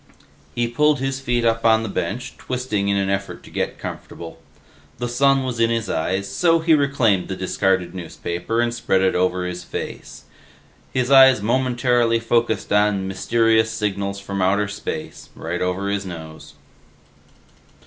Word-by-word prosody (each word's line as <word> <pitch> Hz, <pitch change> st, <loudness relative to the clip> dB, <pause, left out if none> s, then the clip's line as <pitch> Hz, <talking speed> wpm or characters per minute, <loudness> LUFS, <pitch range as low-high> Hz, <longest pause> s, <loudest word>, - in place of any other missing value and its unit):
He 120 Hz, 0 st, +1 dB
pulled 150 Hz, +5 st, +2 dB
his 135 Hz, +1 st, -2 dB
feet 120 Hz, -2 st, 0 dB
up 115 Hz, 0 st, +1 dB
on 110 Hz, -1 st, +4 dB
the -, -, -3 dB
bench, 110 Hz, +4 st, -4 dB
twisting 125 Hz, -6 st, -2 dB
in 100 Hz, 0 st, +1 dB
an 100 Hz, 0 st, 0 dB
effort 95 Hz, 0 st, -4 dB
to -, -, -14 dB
get -, -, -2 dB
comfortable. 85 Hz, -1 st, -8 dB, 0.6 s
The 120 Hz, -, -3 dB
sun 135 Hz, +2 st, +3 dB
was 125 Hz, -3 st, -4 dB
in 115 Hz, 0 st, +3 dB
his 115 Hz, -3 st, -1 dB
eyes, 95 Hz, +5 st, -1 dB
so 165 Hz, -, +2 dB
he 165 Hz, 0 st, +2 dB
reclaimed 135 Hz, -10 st, +2 dB
the 95 Hz, -, -4 dB
discarded 95 Hz, -1 st, 0 dB
newspaper 90 Hz, +5 st, -3 dB
and 120 Hz, 0 st, 0 dB
spread 120 Hz, -5 st, +1 dB
it 95 Hz, -1 st, +2 dB
over 90 Hz, 0 st, 0 dB
his 90 Hz, 0 st, -5 dB
face. -, -, -7 dB, 0.7 s
His 130 Hz, +1 st, -1 dB
eyes 130 Hz, -5 st, +7 dB
momentarily 120 Hz, -1 st, +2 dB
focused 115 Hz, -2 st, 0 dB
on 105 Hz, -2 st, +2 dB
MYSTERIOUS 110 Hz, +3 st, +2 dB
SIGNALS 100 Hz, -2 st, -2 dB
FROM 100 Hz, 0 st, -4 dB
OUTER 100 Hz, +2 st, +2 dB
SPACE, 100 Hz, -, -6 dB
right 85 Hz, +2 st, -4 dB
over 90 Hz, +2 st, -1 dB
his 100 Hz, -1 st, -1 dB
nose. 80 Hz, -3 st, -9 dB
110 Hz, 160 wpm, -21 LUFS, 95-120 Hz, 0.7 s, eyes